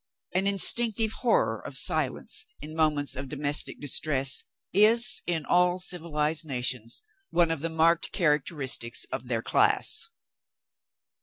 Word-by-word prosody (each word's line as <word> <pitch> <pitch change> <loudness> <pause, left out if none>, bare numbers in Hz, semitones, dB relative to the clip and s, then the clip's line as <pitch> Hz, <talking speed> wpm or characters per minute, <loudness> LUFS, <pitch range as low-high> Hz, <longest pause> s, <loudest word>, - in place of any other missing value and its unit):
An 190 +2 0
instinctive 220 +2 +3
horror 235 0 -1
of - - -7
silence, 435 0 0
in 155 +1 -10
moments 150 -3 0
of 130 +1 -6
domestic 145 0 -1
distress, 135 -1 +1 0.3
is, 225 +5 +6
in 165 -3 -3
all 180 0 +1
civilized 160 -4 -2
nations, 125 - -4 0.3
one 170 -2 +1
of 165 - -3
the 165 - -2
marked 165 +1 0
characteristics 150 - 0
of 125 - -6
their 115 -2 -3
class. 435 - +2
160 Hz, 125 wpm, -26 LUFS, 140-180 Hz, 0.3 s, is